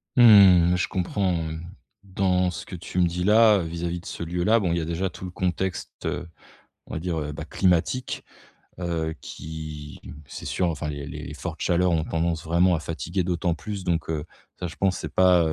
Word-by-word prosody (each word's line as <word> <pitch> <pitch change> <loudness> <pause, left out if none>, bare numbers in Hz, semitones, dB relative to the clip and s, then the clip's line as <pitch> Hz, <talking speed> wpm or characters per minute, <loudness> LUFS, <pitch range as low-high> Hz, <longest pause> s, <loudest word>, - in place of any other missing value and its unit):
Mmh, 95 -7 +8
je 90 - 0
comprends, 95 0 0
mmh 80 -1 -3 0.4
dans 95 -1 +1
ce - - -6
que 95 - -7
tu 90 +1 -4
me 90 - +5
dis 90 +1 -1
là, 110 0 +6
vis-à-vis 85 +1 -3
de - - -16
ce - - -5
lieu 85 +1 -2
là 115 +3 +4
bon 95 -5 0
il 85 - +1
y - - -1
a - - -3
déjà 85 +3 -1
tout 90 - -11
le - - -5
contexte, 90 0 -2
heu, 85 - -2 0.6
on - - -8
va 80 - -2
dire, 85 -1 -2
heu, 75 -1 -3
bah, 75 +1 -6
climatique. 95 +9 0 0.6
Heu, 80 -3 -2
qui 75 -2 -8 0.3
c'est - - -8
sûr 90 -2 0
enfin 75 -2 -3
les 70 -1 -5
les - - -7
les - - -7
fortes - - -6
chaleurs 90 +1 +2
ont 80 -2 +1
tendance 80 0 -1
vraiment 85 +2 +3
à - - -2
fatiguer 85 +3 -3
d'autant 85 -1 0
plus 100 +3 -6
donc 85 -3 -1
heu, 75 -2 -2 0.4
ça 90 - -2
je 85 - -9
pense 95 -2 +1
c'est 80 - -5
pas, 90 0 +5
85 Hz, 215 wpm, -25 LUFS, 80-90 Hz, 0.6 s, Mmh